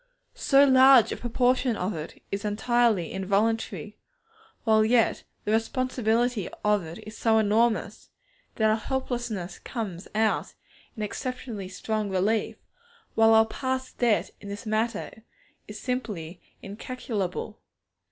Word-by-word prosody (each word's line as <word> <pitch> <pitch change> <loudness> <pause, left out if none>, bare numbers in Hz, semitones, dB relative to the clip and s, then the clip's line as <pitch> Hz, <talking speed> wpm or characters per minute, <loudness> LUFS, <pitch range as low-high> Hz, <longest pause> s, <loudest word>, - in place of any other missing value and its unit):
So 275 0 +4
large 260 -2 +7
a - - -1
proportion 245 0 +1
of 190 +1 -2
it 155 -1 -8
is 200 +1 -3
entirely 220 -3 +1
involuntary, 210 +2 -1 0.6
while 220 -1 +4
yet 230 +1 +3 0.2
the 210 - 0
responsibility 235 -1 0 0.2
of 210 -2 +3
it 160 +1 -8
is 215 +1 -9
so 225 -1 +2
enormous, 220 0 +1 0.5
that 220 -1 +3
our 215 - +2
helplessness 240 -6 -3
comes 200 -8 -5
out 220 0 0 0.4
in 215 - -3
exceptionally 230 -2 -5
strong 210 +3 -3
relief, 195 +4 0 0.6
while 225 0 +5
our 220 0 +6
past 260 +2 -4
debt 235 -4 +2
in 200 - -9
this 200 +2 -7
matter 220 0 -2 0.5
is 210 0 -8
simply 205 -10 -4 0.2
incalculable. 210 -1 -4
220 Hz, 125 wpm, -26 LUFS, 205-240 Hz, 0.6 s, large